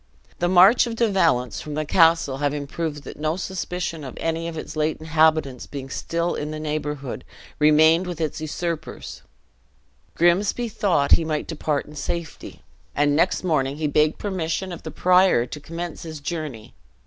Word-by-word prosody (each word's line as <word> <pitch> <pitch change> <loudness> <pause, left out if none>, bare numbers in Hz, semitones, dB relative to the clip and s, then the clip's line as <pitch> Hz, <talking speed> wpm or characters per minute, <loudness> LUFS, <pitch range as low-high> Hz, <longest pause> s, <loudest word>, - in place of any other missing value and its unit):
The 175 - +1
march 190 +7 +6
of 230 - -4
De 230 0 +2
Valence 160 - +1
from 150 -1 -6
the 155 0 -1
castle 165 -4 +3
having 145 0 -1
proved 150 0 -4
that - - -10
no 155 +2 -1
suspicion 180 -3 -4
of 130 - -8
any 165 0 -2
of 165 -1 -6
its - - -7
late 155 0 0
inhabitants 155 -4 +1
being 135 -2 -7
still 170 +1 -2
in 150 - -4
the 155 0 -5
neighborhood 150 -3 -4 0.4
remained 160 +4 +5
with 175 -2 -5
its 155 -1 -2
usurpers, 165 +1 -5 0.9
Grimsby 200 +7 +2
thought 180 -9 +1
he - - +6
might 155 -1 -2
depart 150 -2 -2
in 150 - -13
safety; 165 +2 -6 0.3
and 145 0 +2
next 175 +5 +2
morning 145 -5 0
he 155 - -2
begged 150 +1 +2
permission 185 -1 -3
of 175 - -7
the - - -7
prior 180 -8 +4
to 150 - -8
commence 165 +3 -6
his 160 -2 -7
journey. 145 -7 -6
160 Hz, 170 wpm, -23 LUFS, 150-175 Hz, 0.9 s, march